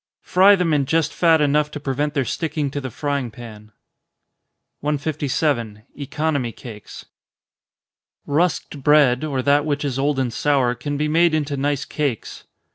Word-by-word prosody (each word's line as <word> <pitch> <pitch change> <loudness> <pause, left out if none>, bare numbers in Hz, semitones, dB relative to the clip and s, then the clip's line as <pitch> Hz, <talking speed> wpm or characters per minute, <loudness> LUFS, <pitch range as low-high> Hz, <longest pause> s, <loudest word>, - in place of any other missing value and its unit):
Fry 195 +3 +5
them 180 -4 0
in 140 -3 +1
just 160 0 +1
fat 165 -3 +3
enough 150 +1 +2
to 150 - -7
prevent 145 +1 -2
their 135 -2 +1
sticking 150 0 -2
to 145 - -4
the 130 - -5
frying 140 0 -3
pan. 110 -2 -12 1.1
157. 140 -6 -2
Economy 145 -2 -2
Cakes. 110 -3 -11 1.2
Rusked 150 -1 -1
bread, 140 -2 +4
or 135 -4 -2
that 145 +1 +3
which 145 -1 -2
is 135 -2 -2
old 145 0 0
and 130 -3 -1
sour, 135 -3 +1
can 145 +3 -4
be 150 +1 0
made 165 +1 +3
into 145 -2 -1
nice 140 +1 -1
cakes. 140 -7 -4
145 Hz, 150 wpm, -21 LUFS, 130-150 Hz, 1.2 s, Fry